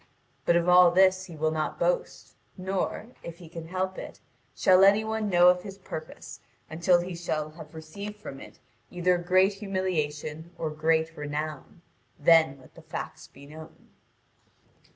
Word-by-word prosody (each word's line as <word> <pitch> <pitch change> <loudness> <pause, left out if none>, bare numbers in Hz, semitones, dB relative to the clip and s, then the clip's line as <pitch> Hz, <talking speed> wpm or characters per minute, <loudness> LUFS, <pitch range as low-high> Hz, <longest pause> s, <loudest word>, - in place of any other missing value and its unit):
But 170 - +4
of 170 0 +2
all 180 0 +7
this 185 +1 +3
he 170 - -11
will 155 +1 0
not 155 -1 -2
boast, - - -2 0.2
nor, 190 +4 -3
if 170 -1 -9
he 175 - -12
can 165 0 -9
help 185 +1 -3
it, - - -9 0.4
shall 185 0 +5
any 205 +2 +5
one 220 -1 -2
know 175 -1 +6
of 180 0 +2
his 195 0 -9
purpose 155 -4 -9 0.3
until 175 +2 +3
he 180 +1 -6
shall 155 -3 -3
have 160 +1 -13
received 200 +7 -8
from 175 -10 -9
it - - -13 0.3
either 180 0 +1
great 185 +3 +3
humiliation 170 -5 -3
or 160 -2 -3
great 160 +1 0
renown: 150 +2 -6 0.3
then 160 -2 +4
let 130 - -19
the - - -14
facts - - -7
be 140 +1 -16
known. 155 +2 -13
175 Hz, 160 wpm, -27 LUFS, 155-185 Hz, 0.4 s, all